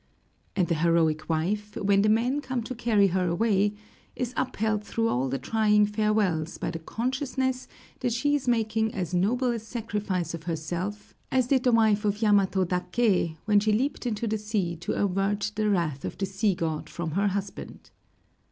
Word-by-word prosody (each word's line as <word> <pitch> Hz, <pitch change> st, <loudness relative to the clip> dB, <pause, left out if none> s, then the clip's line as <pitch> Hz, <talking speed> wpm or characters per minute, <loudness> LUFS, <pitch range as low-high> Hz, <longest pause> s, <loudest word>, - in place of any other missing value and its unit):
And 185 Hz, -3 st, +2 dB
the 170 Hz, -, +1 dB
heroic 165 Hz, -2 st, +2 dB
wife, 205 Hz, +6 st, -1 dB
when 200 Hz, 0 st, +3 dB
the 215 Hz, -, +3 dB
men 245 Hz, +6 st, +2 dB
come 255 Hz, -4 st, -3 dB
to 255 Hz, -, -5 dB
carry 220 Hz, -5 st, +3 dB
her 185 Hz, 0 st, 0 dB
away, 205 Hz, +2 st, +2 dB, 0.4 s
is 250 Hz, -1 st, -3 dB
upheld 220 Hz, -4 st, -1 dB
through 225 Hz, +2 st, -1 dB
all 130 Hz, +2 st, 0 dB
the 135 Hz, -, -1 dB
trying 210 Hz, -, +3 dB
farewells 210 Hz, -6 st, 0 dB
by -, -, -3 dB
the 165 Hz, -, -5 dB
consciousness 260 Hz, -, -2 dB, 0.3 s
that 245 Hz, -, 0 dB
she 290 Hz, +5 st, +1 dB
is 285 Hz, -3 st, -1 dB
making 220 Hz, -2 st, +1 dB
as 185 Hz, -3 st, -3 dB
noble 240 Hz, +8 st, +2 dB
a 235 Hz, -, -2 dB
sacrifice 210 Hz, -6 st, -3 dB
of 165 Hz, -1 st, -7 dB
herself 175 Hz, +5 st, -4 dB, 0.2 s
as 260 Hz, -1 st, +3 dB
did 260 Hz, 0 st, +2 dB
the 250 Hz, -, +5 dB
wife 220 Hz, -2 st, +3 dB
of 210 Hz, 0 st, 0 dB
Yamato 200 Hz, -3 st, +3 dB
Daké 180 Hz, -1 st, +1 dB
when 210 Hz, -1 st, +4 dB
she 215 Hz, +1 st, +1 dB
leaped 260 Hz, +3 st, -1 dB
into 230 Hz, 0 st, -2 dB
the 220 Hz, -1 st, -1 dB
sea 205 Hz, -5 st, -1 dB
to 175 Hz, -, -3 dB
avert 200 Hz, +1 st, 0 dB
the 215 Hz, 0 st, +1 dB
wrath 165 Hz, -8 st, 0 dB
of -, -, -5 dB
the 195 Hz, -, -1 dB
sea 195 Hz, +1 st, 0 dB
god 160 Hz, -3 st, -3 dB
from 170 Hz, -2 st, -4 dB
her 200 Hz, +5 st, +1 dB
husband. 200 Hz, 0 st, -5 dB
210 Hz, 180 wpm, -27 LUFS, 180-225 Hz, 0.4 s, the